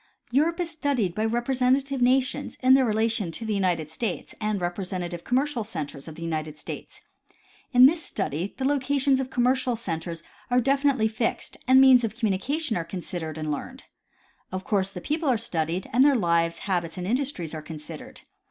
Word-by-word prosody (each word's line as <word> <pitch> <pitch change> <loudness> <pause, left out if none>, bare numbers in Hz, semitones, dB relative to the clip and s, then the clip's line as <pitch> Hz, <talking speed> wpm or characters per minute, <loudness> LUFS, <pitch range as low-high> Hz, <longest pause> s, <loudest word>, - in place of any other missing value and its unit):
Europe 320 +7 +2
is 340 -2 -1
studied 280 - 0
by 215 - -2
representative 255 +3 +1
nations 255 +1 +1
in 260 +1 +7
their 265 0 +6
relation 220 -4 +1
to 225 +8 -6
the 220 - -1
United 175 -6 0
States 200 +2 -4
and 215 -1 0
representative 175 -1 -4
commercial 260 -1 0
centers 155 -9 -6
of 160 - -8
the 165 - -8
United 155 -2 -3
States. - - -8 0.7
In 250 -1 +8
this 320 +5 +4
study 190 - -3
the 265 - -2
locations 275 -1 +2
of, 260 -1 -3
commercial 255 0 +1
centers 165 -6 -5 0.3
are 250 0 +4
definitely 270 -2 +2
fixed 220 +1 -2
and 260 +1 +7
means 260 -2 +7
of 215 -2 -2
communi 210 -5 0
cation 295 -2 -1
are 170 - -1
considered 165 -2 -5
and 155 -1 -3
learned. 145 - -6 0.7
Of 185 0 -4
course 195 -2 0
the 180 -2 -8
people 305 - -1
are 250 - +3
studied, 170 -4 -2
and 255 +3 +6
their 285 -1 +5
lives, 170 -5 +1
habits 175 -3 -1
and 180 - -4
industries 235 - -2
are 155 - -5
considered. 155 0 -9
220 Hz, 180 wpm, -26 LUFS, 170-260 Hz, 0.7 s, In